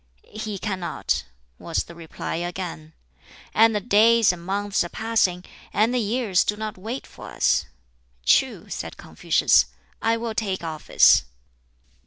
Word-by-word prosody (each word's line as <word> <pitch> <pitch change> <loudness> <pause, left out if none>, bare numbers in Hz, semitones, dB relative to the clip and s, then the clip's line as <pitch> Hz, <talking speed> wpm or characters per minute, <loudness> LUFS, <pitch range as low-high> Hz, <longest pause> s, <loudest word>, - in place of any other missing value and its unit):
"He 215 -1 -4
cannot," 190 -3 -2 0.3
was - - -2
the 170 - -13
reply 165 -1 -6
again. 175 -3 -5 0.6
"And 225 0 +5
the - - +2
days 225 +1 +5
and 170 -1 -10
months 200 +2 0
are 175 - -6
passing; 215 -5 0 0.3
and 220 +5 +2
the 250 - +1
years 220 -3 +1
do 210 - -1
not 215 0 -4
wait 225 +8 -6
for - - -11
us." - - +1 0.6
"True," - - +2
said - - -6
Confucius; - - +2 0.4
"I 225 0 +2
will 230 -1 -4
take 195 -5 -2
office." 155 - +4
205 Hz, 140 wpm, -24 LUFS, 180-225 Hz, 0.6 s, And